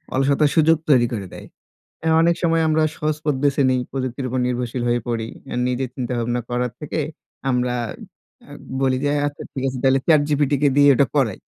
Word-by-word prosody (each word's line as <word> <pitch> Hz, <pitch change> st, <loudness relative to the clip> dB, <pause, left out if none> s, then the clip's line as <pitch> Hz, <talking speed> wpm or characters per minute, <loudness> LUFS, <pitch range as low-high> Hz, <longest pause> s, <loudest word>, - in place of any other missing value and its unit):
অলসতার 140 Hz, +2 st, +3 dB
সুযোগ 160 Hz, 0 st, +5 dB
তৈরি 125 Hz, -4 st, +5 dB
করে 100 Hz, -4 st, -4 dB
দেয়। -, -, -10 dB, 0.7 s
অনেক 170 Hz, +1 st, +4 dB
অ্যা -, -, -12 dB
সময় 165 Hz, -1 st, +2 dB
আমরা 155 Hz, 0 st, +2 dB
সহজ 150 Hz, 0 st, -1 dB
পথ 150 Hz, -2 st, +1 dB
দেশে 140 Hz, 0 st, +2 dB
নেই। 130 Hz, 0 st, +2 dB
প্রযুক্তির 130 Hz, 0 st, -3 dB
উপর 130 Hz, +1 st, -1 dB
নির্ভরশীল 125 Hz, 0 st, -2 dB
হয়ে 120 Hz, -1 st, +1 dB
পড়ি। 115 Hz, -2 st, -2 dB, 0.2 s
অ্যা -, -, -5 dB
নিজে 125 Hz, +1 st, -1 dB
চিন্তাভাবনা 120 Hz, -1 st, -2 dB
করার 125 Hz, 0 st, -1 dB
থেকে 150 Hz, +1 st, -4 dB, 0.5 s
আমরা 125 Hz, 0 st, 0 dB, 0.7 s
অ্যা -, -, -13 dB, 0.3 s
বলি 130 Hz, -1 st, +2 dB
যে -, -, +1 dB
অ্যা 145 Hz, -, 0 dB
আচ্ছা 145 Hz, -, -7 dB
ঠিক 130 Hz, -, -4 dB
আছে 130 Hz, -, -3 dB
তাইলে 135 Hz, 0 st, +4 dB
ChatGPT 145 Hz, -2 st, +3 dB, 0.2 s
দিয়ে 145 Hz, 0 st, +6 dB
ওইটা 135 Hz, +1 st, +3 dB
করাই। 120 Hz, -9 st, +1 dB
130 Hz, 185 wpm, -21 LUFS, 125-145 Hz, 0.7 s, দিয়ে